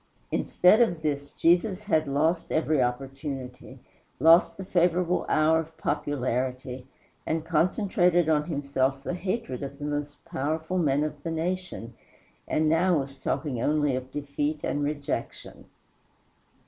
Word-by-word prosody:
Instead 195 +6 +4
of 175 -9 +1
this, 145 -2 -2
Jesus 180 +6 +2
had 160 -7 +1
lost 160 +5 0
every 155 -3 +2
opportunity, 135 +1 -4 0.4
lost 165 +3 +5
the 190 - -6
favorable 175 0 +1
hour 155 +1 +4
of 160 0 -7
popularity, 130 -1 -2 0.4
and 160 0 -2
concentrated 175 0 +2
on 150 -2 +2
himself 140 -3 -1
the 175 - -3
hatred 185 - -3
of 140 0 -6
the 145 - -6
most 145 0 -4
powerful 160 +6 -2
men 145 -3 +2
of 150 -1 -4
the 165 - -4
nation, 165 -7 -3 0.5
and 155 0 +1
now 170 +2 +3
was 135 -1 -5
talking 130 -7 -2
only 150 -1 +2
of 130 0 -5
defeat 145 +1 -2
and 145 - -1
rejection. 145 -1 -4
150 Hz, 135 wpm, -27 LUFS, 140-170 Hz, 0.5 s, lost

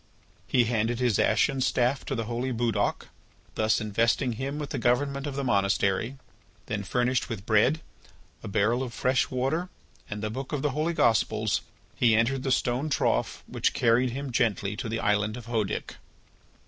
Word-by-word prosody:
He 125 - +3
handed 115 +1 0
his 120 -5 +2
ashen 135 - +2
staff 125 +1 +1
to 135 - -2
the 115 - -1
holy 120 +3 -2
Budoc, 115 -2 -1 0.4
thus 110 0 +2
investing 115 +4 +1
him 135 +5 -4
with 150 -2 -5
the - - -2
government 140 +3 +1
of 140 - -4
the 140 - -2
monastery. 100 +2 +1 0.5
Then, 105 -1 -3
furnished 125 +4 0
with 105 -4 -5
bread, 120 +9 +3 0.6
a - - -7
barrel 110 +5 +1
of 125 -3 -5
fresh 130 0 +1
water, 135 +8 -1 0.4
and 105 0 -5
the 110 - -2
book 135 +5 -6
of 145 - -2
the 150 - +1
Holy 155 +5 -1
Gospels, 115 -8 +2 0.3
he 115 -3 +4
entered 125 +4 +2
the 130 - -1
stone 130 +4 +1
trough 140 - 0
which - - 0
carried 120 +2 +3
him 135 +2 -5
gently 105 -4 0
to 115 +2 -4
the 115 +1 -2
island 105 +1 +1
of 120 - -9
Hœdic. 110 -4 -2
120 Hz, 175 wpm, -27 LUFS, 110-135 Hz, 0.6 s, he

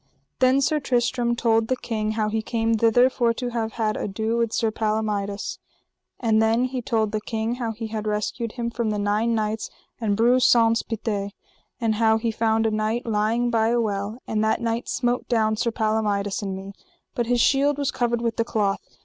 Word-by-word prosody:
Then 260 +1 +4
Sir 300 +2 +2
Tristram 245 -2 0
told 225 -1 +2
the 255 - +1
king 215 -3 -3
how 215 -1 0
he 220 +1 -1
came 225 0 0
thither 230 +3 +4
for 240 -3 +1
to 245 +1 -4
have 225 -2 -3
had 215 -2 -1
ado 220 +3 -2
with 230 -1 0
Sir 225 -1 0
Palomides. 210 -2 -2 0.6
And 220 -2 +2
then 225 +2 +3
he 255 0 -3
told 220 -3 0
the 215 -1 -2
king 225 +2 -2
how 230 -2 -1
he 225 +1 -6
had 215 -1 -4
rescued 215 +2 -2
him 235 -1 -3
from 235 -2 -1
the 210 - -1
nine 210 +3 +1
knights 215 0 -2 0.3
and 210 -3 0
Breuse 245 +3 +4
Saunce 230 -1 +4
Pité; 215 -3 -3 0.5
and 225 -3 +1
how 220 -1 +4
he 225 0 -1
found 225 0 +1
a 220 - +2
knight 215 +3 -1
lying 225 +2 +1
by 225 -1 +2
a 240 +1 +2
well, 205 0 -2
and 215 0 -1
that 220 - +1
knight 230 0 -2
smote 245 0 -1
down 220 -3 +2
Sir 235 +2 0
Palomides 215 -3 0
and 195 -2 -3
me, 195 +1 -8 0.4
but 240 -2 -1
his 245 0 +2
shield 280 +3 +3
was 285 -2 0
covered 240 -1 0
with 230 -1 -2
a - - +4
cloth. 205 -3 -2
225 Hz, 200 wpm, -24 LUFS, 215-235 Hz, 0.6 s, Then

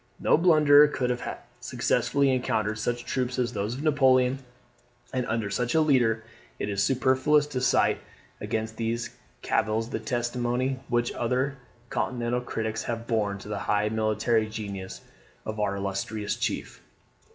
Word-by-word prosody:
No - - +4
blunderer 150 -3 +6
could 125 -4 -1
have 120 - -4 0.2
successfully 140 -1 +1
encountered 110 -4 0
such 120 +2 -2
troops 130 -1 -2
as 120 -2 0
those 105 +3 -2
of 140 - -6
Napoleon, 130 -3 +3 0.7
and 125 -1 -1
under 110 -3 -1
such 120 +5 -1
a 160 - +5
leader. 120 -7 +3 0.3
It - - -3
is 100 -1 0
superfluous 135 +4 +3
to 140 -4 -4
cite - - +3 0.4
against 110 0 -3
these 115 +1 -2 0.3
cavils 110 +2 0
the - - -2
testimony 125 +1 -1
which 120 -1 +1
other 130 +4 -1 0.3
continental 120 -1 -1
critics 110 -2 -3
have 115 -1 -3
borne 105 -4 0
to 100 - -11
the 105 -1 -3
high 105 0 +2
military 110 +1 +1
genius 100 -4 -6 0.4
of 110 0 -4
our 100 -2 0
illustrious 100 +2 -3
chief. - - -3
120 Hz, 145 wpm, -27 LUFS, 110-130 Hz, 0.7 s, blunderer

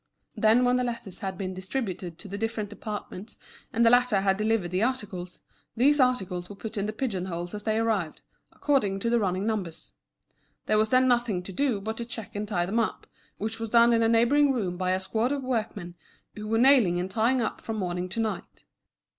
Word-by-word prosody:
Then 225 +3 +4
when 250 0 +3
the 250 - +1
letters 230 -6 -5
had 190 -2 -4
been 185 -1 -4
distributed 185 -3 -4
to 210 - -10
the 200 - -6
different 220 -2 -3
departments 210 -1 -7 0.3
and 235 -1 +2
the 230 - +6
latter 245 -5 +4
had 195 -1 +2
delivered 215 -3 0
the 185 +2 0
articles, 205 -8 -3 0.4
these 290 +5 +4
articles 190 -9 +1
were 205 - -8
put 220 +3 -7
in 200 -1 -1
the - - -1
pigeon 215 -6 -3
holes 175 0 -5
as 210 - -5
they 215 +1 0
arrived, 215 -8 -1 0.3
according 210 -10 +1
to 230 - 0
the 235 - +3
running 190 -1 -1
numbers. 200 -7 -4 0.7
There 215 - +2
was 215 0 +2
then 255 +1 +4
nothing 240 -7 +1
to 190 - -8
do 260 -3 +1
but 220 +3 -4
to 235 - -3
check 225 -3 -8
and 210 +1 -3
tie 175 -5 0
them 210 +6 0
up, 230 - -2 0.3
which 220 +2 -4
was 225 -1 -4
done 235 +1 +5
in 230 - +3
a 225 - +3
neighbouring 265 +5 +4
room 200 -9 -1
by 185 0 -1
a 185 - 0
squad 220 +6 -1
of 280 -1 -2
workmen 215 -8 -3 0.4
who 210 0 -7
were 225 +1 +1
nailing 235 -9 +5
and 185 +2 -3
tying 235 +5 +2
up 225 - -2
from 225 - -4
morning 180 -2 -2
to 190 - -4
night. 220 -1 -4
215 Hz, 215 wpm, -27 LUFS, 190-235 Hz, 0.7 s, the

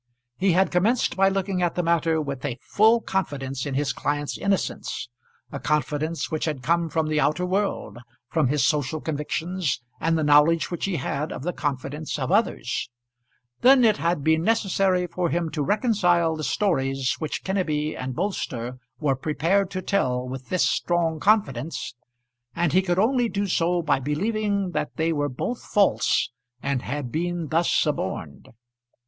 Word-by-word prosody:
He 190 -1 +2
had 190 +2 +3
commenced 210 +8 +2
by 195 0 +4
looking 195 -1 -1
at 175 -2 0
the 180 - 0
matter 165 -1 +2
with 140 -3 -4
a 120 - -3
full 220 +3 +4
confidence 135 -10 -3
in 135 - -3
his 140 0 0
client's 145 0 -2
innocence, 195 -10 -2 0.4
a 140 - -5
confidence 150 +2 -1
which 155 - -1
had 150 -5 -3
come 170 +2 +1
from 160 +1 0
the 155 0 +1
outer 150 +5 +1
world, 185 - -2 0.3
from 155 0 +1
his 140 0 +2
social 150 0 0
convictions, 160 +1 -2 0.2
and 165 0 +1
the 160 - 0
knowledge 150 +3 +4
which 175 - -2
he 195 -2 -1
had 150 +1 -2
of - - -6
the 180 +2 -2
confidence 145 +2 -3
of 135 +2 -2
others. 195 - 0 0.7
Then 255 -1 +6
it 215 -1 +4
had 170 -3 0
been 160 +1 +3
necessary 195 -3 +2
for 175 0 -2
him 170 -1 -1
to 150 - -2
reconcile 180 - +2
the 155 - -5
stories 135 -10 0
which 155 -2 -3
Kenneby 155 -6 -1
and 130 -1 -5
Bolster 130 - -3 0.2
were 140 -3 +1
prepared 165 +8 +1
to 185 - -4
tell 125 -12 0
with 130 0 -7
this 185 - +2
strong 165 -2 0
confidence, 165 - +1 0.6
and 170 -2 +1
he 185 - +5
could 175 -2 -1
only 240 +3 +2
do 205 -1 -1
so 175 -2 +1
by 145 -4 +2
believing 200 - -1
that - - -3
they 165 0 +1
were 145 -1 0
both 230 - -4
false 200 - +2 0.3
and 135 -1 -1
had 135 -2 -4
been 170 0 -2
thus 165 +2 +2
suborned. - - -1
165 Hz, 165 wpm, -24 LUFS, 145-190 Hz, 0.7 s, Then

